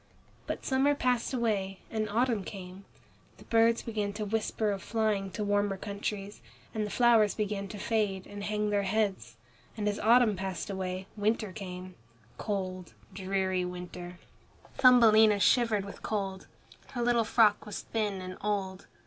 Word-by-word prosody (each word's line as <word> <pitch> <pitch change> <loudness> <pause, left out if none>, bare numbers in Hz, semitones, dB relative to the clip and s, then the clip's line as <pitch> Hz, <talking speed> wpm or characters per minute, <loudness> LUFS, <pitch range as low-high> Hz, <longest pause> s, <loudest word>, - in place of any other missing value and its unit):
But - - -4
summer 275 +2 +3
passed 250 -3 0
away 205 -6 -1
and 215 -1 -1
autumn 230 -1 +1
came. 190 0 -9 0.5
The - - -14
birds 230 0 +3
began 210 -3 -2
to 210 0 -4
whisper 215 0 -1
of 195 -1 -3
flying 215 -4 0
to 210 - -3
warmer 205 -1 +1
countries, 200 0 -5 0.3
and 215 -1 -1
the - - -7
flowers 230 -3 +4
began 205 -2 -2
to 205 - -8
fade 210 -3 -1
and 205 0 -8
hang 210 0 -1
their 205 -1 +2
heads, 195 - -1 0.4
and 210 -1 -1
as 205 0 -1
autumn 230 -1 +5
passed 190 +1 -4
away, 185 -1 -4
winter 215 0 0
came, 185 -2 -7 0.5
cold, 185 -4 -4 0.2
dreary 190 -1 -1
winter. 180 0 -7 0.6
Thumbelina 220 -5 +6
shivered 215 -1 +3
with 200 - -10
cold. 195 -3 -3 0.5
Her 240 -2 -1
little 240 -1 +3
frock 215 -1 +3
was 210 - -5
thin 205 -4 -2
and 185 0 -7
old. 195 -2 -2
205 Hz, 150 wpm, -30 LUFS, 190-220 Hz, 0.6 s, Thumbelina